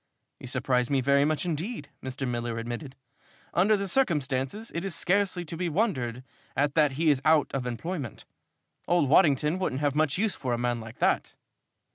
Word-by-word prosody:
"You 130 - -9
surprise 125 -1 0
me 140 -2 +2
very 140 +2 +3
much 155 +3 0
indeed," 175 +8 -3
Mr. 130 +1 -4
Miller 120 -1 -2
admitted. 120 +4 -5 0.6
"Under 205 +4 +4
the 200 0 -3
circumstances, 160 - 0
it 170 - -3
is 195 -3 0
scarcely 190 -2 +1
to 165 - -6
be 175 +1 -2
wondered 135 - -1 0.3
at 145 +1 +2
that 150 -3 +3
he 155 +3 +3
is 135 -2 0
out 155 -1 +4
of 130 -2 -2
employment. 135 - -5 0.6
Old 175 -5 +3
Waddington 150 +1 +4
wouldn't 145 -7 -1
have 145 -2 +1
much 150 0 +1
use 215 +1 +1
for 125 -3 -3
a - - 0
man 120 0 -1
like 110 0 -10
that." - - +1
145 Hz, 180 wpm, -27 LUFS, 130-175 Hz, 0.6 s, Under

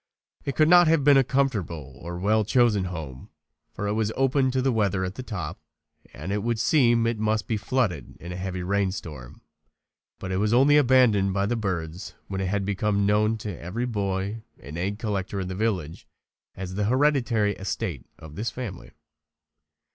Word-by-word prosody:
It 140 - -2
could 155 - +4
not 175 0 +7
have 160 -2 +3
been 145 0 +6
a 135 - +5
comfortable 100 - -2
or 85 +2 -6
well 105 +4 +2
chosen 110 -3 +3
home, 80 -8 -7 0.4
for 105 - -5
it 100 - 0
was 110 0 0
open 135 0 +2
to 130 +1 0
the 130 +1 +2
weather 100 -4 +1
at 90 - -4
the 130 - -7
top 90 -11 -5 0.5
and 80 +7 -6
it 105 0 0
would 115 +1 -1
seem 120 -3 +3
as 115 - +2
if 115 - -5
it - - -6
must 110 0 0
be 115 - 0
flooded 105 - -1
in 85 - -9
a - - -5
heavy 90 0 -4
rain 100 +1 +1
storm. 75 - -9 0.8
But 95 - -6
it 95 - 0
was 105 +3 +1
only 140 +4 +5
abandoned 120 -8 +4
by 100 0 +1
the 120 +4 0
birds 90 -5 -4
when 95 -1 -3
it 95 - -1
had 100 +1 -1
become 100 0 0
known 105 +2 +2
to 105 -4 -3
every 95 +9 -4
boy 100 -1 -2 0.2
and 70 +3 -9
egg 95 +4 -2
collector 100 -3 -3
in 95 -1 -3
the - - -3
village 95 -6 -2 0.5
as 95 0 -6
the 105 +2 -1
hereditary 125 -4 +2
estate 95 - -4
of 80 -1 -12
this 110 +6 -2
family. 115 -8 -7
105 Hz, 195 wpm, -25 LUFS, 95-120 Hz, 0.8 s, not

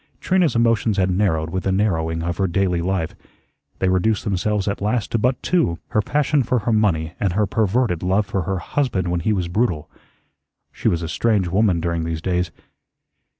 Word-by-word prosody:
Trina's 180 -8 +2
emotions 115 -2 +2
had 95 -1 +2
narrowed 85 -5 0
with 95 +1 -2
the 95 - 0
narrowing 80 -5 0
of 85 0 -2
her 95 - +1
daily 90 -1 0
life. 90 -2 -1 0.6
They 95 - 0
reduced 95 +4 +1
themselves 105 0 -1
at 100 - -2
last 105 0 -1
to 115 - +1
but 125 +3 0
two, 125 - +1
her 105 - +2
passion 145 +4 +1
for 125 +1 0
her 115 +1 0
money 85 -7 +1
and 95 -4 0
her 105 +3 +2
perverted 110 -3 0
love 95 +3 +1
for 100 -1 -2
her 95 +2 -2
husband 100 -4 -1
when 90 0 0
he 95 +6 0
was 95 -4 0
brutal. 90 -4 -1 0.8
She - - -3
was 85 -1 +1
a - - -3
strange 100 +1 +1
woman 95 -1 +2
during 85 0 -1
these 80 -1 -3
days. 90 -1 0
95 Hz, 195 wpm, -21 LUFS, 85-110 Hz, 0.8 s, Trina's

